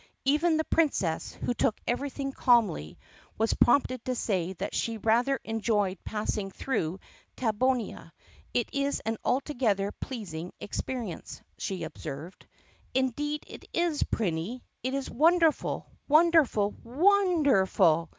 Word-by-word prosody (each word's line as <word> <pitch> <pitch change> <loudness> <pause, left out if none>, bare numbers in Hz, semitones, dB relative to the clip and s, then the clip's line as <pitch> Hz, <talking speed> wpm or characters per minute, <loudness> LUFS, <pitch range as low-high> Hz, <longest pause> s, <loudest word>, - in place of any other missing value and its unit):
Even 310 +4 +3
the 315 - +1
Princess, 275 - 0
who 245 - -2
took 220 - +1
everything 275 +2 -2
calmly, 230 - +2 0.4
was 225 +1 +2
prompted 255 -1 +3
to 255 - -2
say 190 -6 -1
that 180 - -5
she 230 -1 -1
rather 240 +5 +2
enjoyed 210 -4 0
passing 210 -2 -2
through 190 -5 -2 0.4
Tab 220 -4 -1
bonia. 250 -9 0 0.4
"It 240 - +1
is 280 0 0
an 225 0 -2
altogether 240 -7 +1
pleasing 180 -11 -6
experience," 230 -3 -5 0.2
she 185 -3 -3
observed. 160 +1 -7 0.5
"Indeed 290 +4 0
it - - -11
is, 335 -3 +1
Prinny! 200 +4 -1 0.2
It 260 +2 -2
is 275 -1 -2
wonderful, 325 +3 +2 0.2
wonderful, 300 -10 +4
WON 360 +6 +3
DERFUL!" 190 - +3
240 Hz, 120 wpm, -29 LUFS, 195-280 Hz, 0.5 s, wonderful